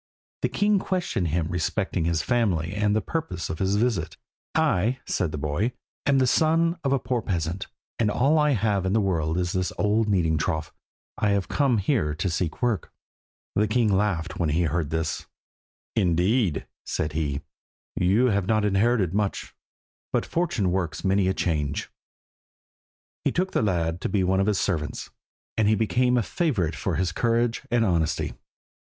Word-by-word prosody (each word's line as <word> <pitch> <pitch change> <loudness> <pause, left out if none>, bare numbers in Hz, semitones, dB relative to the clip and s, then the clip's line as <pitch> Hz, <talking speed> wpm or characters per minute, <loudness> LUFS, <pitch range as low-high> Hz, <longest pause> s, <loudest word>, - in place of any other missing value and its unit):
The - - +1
king 205 -1 +2
questioned 180 - -1
him 80 +1 0
respecting 90 +1 -1
his 85 -2 +1
family 95 -9 +1
and 105 0 +1
the 110 - +1
purpose 160 - -3
of 80 - -5
his 95 +1 +1
visit. 115 0 0 0.4
"I," 130 - +2
said 85 -4 -1
the 75 - -4
boy, 75 - -1 0.3
"am 140 -1 +4
the 130 - +4
son 165 +5 +2
of 135 - +1
a 140 - +4
poor 125 -2 -1
peasant, 90 -1 -2 0.3
and 110 -3 +3
all 140 +9 +3
I 150 -1 +3
have 105 -4 +1
in 95 - +1
the 110 - +4
world 85 -5 0
is 90 -1 -1
an 95 - +1
old 105 +1 +2
kneading 80 -6 +2
trough. 80 -1 -2 0.5
I 105 - +2
have 100 -2 0
come 135 -5 +2
here 95 - +1
to 90 +3 -1
seek 80 +5 -2
work." 115 -7 0 0.6
The 105 +1 +2
king 110 -1 +2
laughed 95 -4 -1
when 85 -3 +1
he 80 +4 +2
heard 80 -1 -1
this. 80 0 -2 0.7
"Indeed," 90 - +2 0.2
said 75 0 -2
he, 75 -2 -1 0.5
"you 105 +8 +3
have 100 -2 0
not 110 -1 +2
inherited 100 -2 +2
much, 100 -1 -2 0.6
but - - 0
fortune 165 - 0
works 90 -4 -2
many 95 0 +3
a 95 - +2
change." 75 -4 -1 1.3
He - - +2
took 185 +2 0
the - - +1
lad 85 -4 0
to - - -1
be 100 -3 +1
one 95 +1 +2
of 95 - +2
his 105 -2 +2
servants, 80 -6 -2 0.5
and 110 - +3
he 110 - +4
became 125 +4 +2
a 120 - +2
favourite 100 - 0
for - - -2
his 90 -2 0
courage 115 +3 +1
and 120 -1 +2
honesty. 85 -5 0
100 Hz, 175 wpm, -25 LUFS, 85-120 Hz, 1.3 s, am